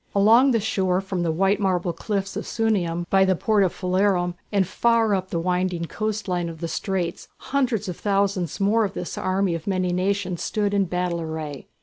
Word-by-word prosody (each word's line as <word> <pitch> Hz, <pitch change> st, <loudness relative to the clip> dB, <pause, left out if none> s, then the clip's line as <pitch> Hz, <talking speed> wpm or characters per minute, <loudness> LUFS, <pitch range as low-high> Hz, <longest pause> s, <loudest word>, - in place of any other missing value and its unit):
Along 225 Hz, +7 st, +6 dB
the 235 Hz, -3 st, +3 dB
shore 190 Hz, -3 st, 0 dB
from 190 Hz, -2 st, -3 dB
the 170 Hz, -1 st, +1 dB
white 195 Hz, +5 st, +2 dB
marble 180 Hz, -3 st, 0 dB
cliffs 200 Hz, +1 st, -3 dB
of -, -, -4 dB
Sunium 180 Hz, -7 st, 0 dB
by 195 Hz, 0 st, +5 dB
the 190 Hz, -1 st, +3 dB
port 210 Hz, +3 st, +2 dB
of 185 Hz, -, +1 dB
Phalerum 185 Hz, -1 st, +1 dB, 0.2 s
and 200 Hz, -2 st, +2 dB
far 225 Hz, +3 st, +2 dB
up 185 Hz, -1 st, -1 dB
the 170 Hz, -, -1 dB
winding 180 Hz, 0 st, -1 dB
coast 215 Hz, +4 st, -3 dB
line 175 Hz, -2 st, -1 dB
of 165 Hz, -1 st, -9 dB
the 170 Hz, -, -3 dB
straits, 180 Hz, -1 st, -3 dB
hundreds 250 Hz, -7 st, -1 dB
of 180 Hz, -, -4 dB
thousands 195 Hz, -4 st, 0 dB
more 210 Hz, +3 st, +3 dB
of 200 Hz, -1 st, -3 dB
this 175 Hz, -, -4 dB
army 185 Hz, -1 st, 0 dB
of 165 Hz, +1 st, -5 dB
many 185 Hz, -2 st, 0 dB
nations 185 Hz, -1 st, -1 dB
stood 205 Hz, -1 st, -1 dB
in 200 Hz, -1 st, +2 dB
battle 180 Hz, -1 st, -2 dB
array. 160 Hz, -3 st, -6 dB
190 Hz, 200 wpm, -24 LUFS, 175-205 Hz, 0.2 s, Along